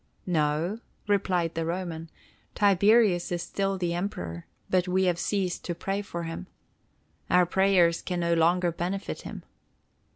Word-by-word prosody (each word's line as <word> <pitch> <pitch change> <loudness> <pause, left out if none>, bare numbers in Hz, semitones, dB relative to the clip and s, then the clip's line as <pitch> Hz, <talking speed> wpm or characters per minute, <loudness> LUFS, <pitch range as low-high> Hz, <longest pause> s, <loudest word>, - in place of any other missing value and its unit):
"No," 165 +4 0 0.3
replied 185 -5 +1
the 165 - -2
Roman, 165 -1 -4 0.5
"Tiberius 200 -2 +4
is 175 -1 -1
still 195 -1 -1
Emperor, 170 - -3 0.2
but 185 0 +1
we 185 +1 +2
have 175 -2 +1
ceased 190 -3 -1
to 175 - -3
pray 195 +3 -2
for 170 -4 -5
him. 165 +3 -6 0.8
Our 180 0 +5
prayers 180 -2 +3
can 180 -1 -3
no 170 0 +2
longer 170 +2 +3
benefit 180 +4 -4
him." - - -8
180 Hz, 135 wpm, -27 LUFS, 170-195 Hz, 0.8 s, Our